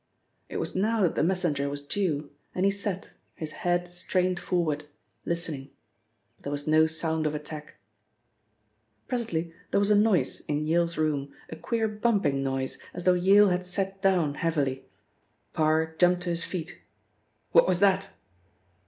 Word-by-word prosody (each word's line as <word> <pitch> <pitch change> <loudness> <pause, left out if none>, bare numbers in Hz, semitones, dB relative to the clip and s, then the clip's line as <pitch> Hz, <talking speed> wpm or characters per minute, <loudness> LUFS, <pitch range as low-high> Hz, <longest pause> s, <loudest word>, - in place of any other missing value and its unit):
It - - -4
was - - -3
now 215 +3 +2
that 175 - +2
the - - 0
messenger 160 -5 +1
was 145 0 -4
due 150 -1 -2 0.2
and 185 - +1
he 200 - +4
sat, 200 -1 -3 0.2
his 155 -3 -5
head 175 -1 0
strained 180 0 0
forward, 155 -5 -1 0.4
listening, 160 -5 -2 0.7
but - - -32
there 140 - -4
was 145 0 -3
no 155 +1 +5
sound 160 0 -1
of 150 - -2
attack. 150 0 -8 1.3
Presently 170 -9 -2 0.2
there - - +2
was 200 +1 +2
a - - +6
noise 205 -3 +2
in 150 +1 -1
Yale's 170 +1 +1
room, 145 -3 0 0.2
a - - -4
queer 220 +8 -1
bumping 210 -10 +1
noise 135 -1 -2 0.2
as 175 - -5
though 180 - +5
Yale 195 +3 +6
had 180 0 0
sat 195 +1 -3
down 180 -7 +2
heavily. 145 -5 -1 0.7
Parr 160 +1 +1
jumped 180 0 +4
to 180 - -3
his 165 -1 -1
feet. 175 -1 -5 0.7
"What - - +6
was 180 -1 +2
that?" 195 0 +3
170 Hz, 160 wpm, -27 LUFS, 155-190 Hz, 1.3 s, a